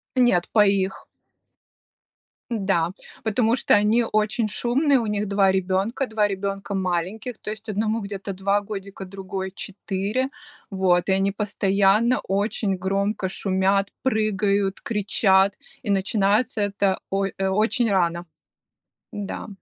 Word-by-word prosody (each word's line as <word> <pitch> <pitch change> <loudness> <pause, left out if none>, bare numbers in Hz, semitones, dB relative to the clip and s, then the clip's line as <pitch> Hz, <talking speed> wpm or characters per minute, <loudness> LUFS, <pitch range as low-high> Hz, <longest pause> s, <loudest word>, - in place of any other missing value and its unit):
Нет, 240 -9 +3
по 210 - +6
их. 195 -1 0 1.4
Да, 195 -7 0 0.3
потому 225 +1 +2
что 255 - +1
они 215 +3 +4
очень 215 +1 +1
шумные, 260 +7 +2
у 230 - -2
них 210 0 -1
2 195 -1 +3
ребенка, 190 +7 0
2 215 -1 +1
ребенка 195 0 -3
маленьких. 190 +6 -2
То - - -6
есть 220 +1 -8
одному 215 +2 0
где-то 200 0 -5
2 200 +2 +1
годика, 200 -2 -7
другой- 190 0 -5
4. 200 +6 -3 0.4
Вот, 190 -2 +2
и - - +4
они 195 +1 +2
постоянно 205 +3 +2
очень 200 0 0
громко 195 +1 -1
шумят, 195 +1 +1
прыгают, 205 -5 +1
кричат, 200 -2 +2 0.3
и 220 - -4
начинается 205 +3 +1
это 200 -1 0
ой 195 0 -1
э, 195 - 0
очень 220 +4 +1
рано. 175 -3 +1 0.9
Да. 205 +1 -5
200 Hz, 125 wpm, -23 LUFS, 190-215 Hz, 1.4 s, по